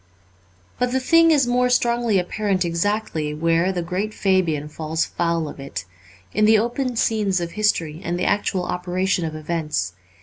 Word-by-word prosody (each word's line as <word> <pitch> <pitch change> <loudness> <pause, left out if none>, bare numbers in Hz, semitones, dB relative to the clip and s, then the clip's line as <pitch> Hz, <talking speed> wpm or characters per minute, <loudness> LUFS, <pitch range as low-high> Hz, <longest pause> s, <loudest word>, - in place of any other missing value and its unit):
But 250 0 +1
the 260 - +1
thing 330 +5 +5
is 290 -5 +4
more 250 +1 +2
strongly 235 -3 +2
apparent 190 +1 0
exactly 170 -3 -1
where 165 +3 +2
the 180 -2 -2
great 190 +5 -3
Fabian 175 -7 +1
falls 155 +1 -2
foul 170 -2 -1
of 145 - -9
it 100 -9 -6 0.2
— 95 -1 -26
in 215 - +3
the 220 +1 +6
open 240 +3 -1
scenes 210 -4 +1
of 170 -1 -4
history 170 -7 0
and 175 +1 -2
the 180 - -1
actual 200 -2 0
operation 180 +1 -1
of 155 -1 -4
events. 155 - -2
185 Hz, 170 wpm, -22 LUFS, 165-215 Hz, 0.2 s, the